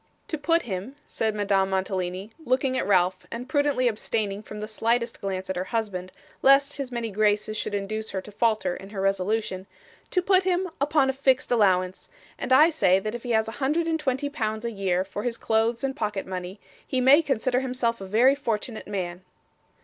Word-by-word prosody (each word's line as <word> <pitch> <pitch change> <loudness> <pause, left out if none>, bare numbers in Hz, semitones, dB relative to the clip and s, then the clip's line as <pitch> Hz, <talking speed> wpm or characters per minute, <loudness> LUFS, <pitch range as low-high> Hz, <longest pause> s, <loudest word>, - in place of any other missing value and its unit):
'To 315 - -1
put 330 +3 +2
him,' 200 +5 -5
said 220 -1 -2
Madame 200 -2 +1
Mantalini, 190 +1 -2
looking 260 0 +1
at - - -1
Ralph, 185 -1 +2
and 240 +2 -6
prudently 285 -3 +2
abstaining 210 -2 -1
from 210 0 -9
the 215 - -4
slightest 230 +2 -1
glance 190 -1 -3
at 190 - -3
her 180 +1 -2
husband, 190 -4 -3 0.3
lest 275 +2 +5
his 275 -3 -4
many 235 -2 -3
graces 210 +1 +1
should 205 - -2
induce 215 +2 -3
her 190 - -3
to 210 - -12
falter 215 -4 +1
in 195 +1 -10
her 205 -2 -6
resolution, 195 0 -1 0.4
'to 365 - +1
put 375 0 +4
him 370 0 +1
upon 285 -2 +3
a - - -11
fixed 265 -2 +1
allowance; 185 -5 +2 0.3
and - - -4
I 305 +6 +7
say 190 - +4
that 215 +2 -4
if 240 - -5
he 245 - -7
has 220 0 +2
a - - -4
hundred 305 +5 +1
and 325 -1 0
twenty 270 -1 -1
pounds 220 -6 -3
a 235 - -1
year 190 -3 0
for 195 +2 -6
his 235 +1 -2
clothes 225 +2 +1
and 270 0 -1
pocket 210 -3 -2
money, 185 +1 -6 0.3
he 260 - 0
may 270 +5 +7
consider 255 -4 0
himself 250 -4 -1
a 195 - -6
very 235 +7 +5
fortunate 235 -4 -3
man. 180 -3 -4
220 Hz, 200 wpm, -26 LUFS, 195-260 Hz, 0.4 s, I